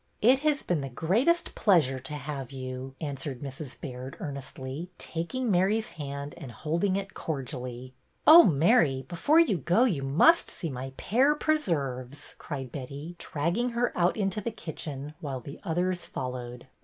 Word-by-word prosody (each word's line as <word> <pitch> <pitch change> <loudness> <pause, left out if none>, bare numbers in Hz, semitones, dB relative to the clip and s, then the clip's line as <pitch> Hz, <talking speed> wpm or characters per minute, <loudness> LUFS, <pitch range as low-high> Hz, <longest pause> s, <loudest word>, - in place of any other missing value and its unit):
" - - -41
It 255 +4 +6
has 300 0 +1
been 170 -5 0
the 135 - -4
greatest 225 - +1
pleasure 155 - +3
to 140 +4 -6
have 140 -3 -5
you," 130 0 -6
answered 140 -3 -5
Mrs. 135 0 -7
Baird, 130 -2 -7
earnestly, 140 +1 -6
taking 220 +9 -2
Mary's 205 +5 +2
hand 140 -1 -6
and 140 -7 -8
holding 170 - 0
it 195 -1 -3
cordially. 130 -4 -5 0.2
' - - -42
Oh, 330 +3 +11
Mary, 150 - +3
before 285 - +3
you 270 - +4
go 175 - +3
you 190 - +1
must 155 - +4
see 165 - -5
my 130 +1 -5
pear 270 +7 +3
preserves," 145 - -1
cried 135 -5 -5
Betty, 140 +5 -7
dragging 170 +11 -1
her 245 0 +1
out 175 +3 +2
into 200 0 0
the 220 - -2
kitchen, 150 -8 -6
while 140 -6 -4
the 140 +4 -10
others 175 +2 -1
followed. 125 -1 -5
150 Hz, 160 wpm, -28 LUFS, 135-195 Hz, 0.2 s, Oh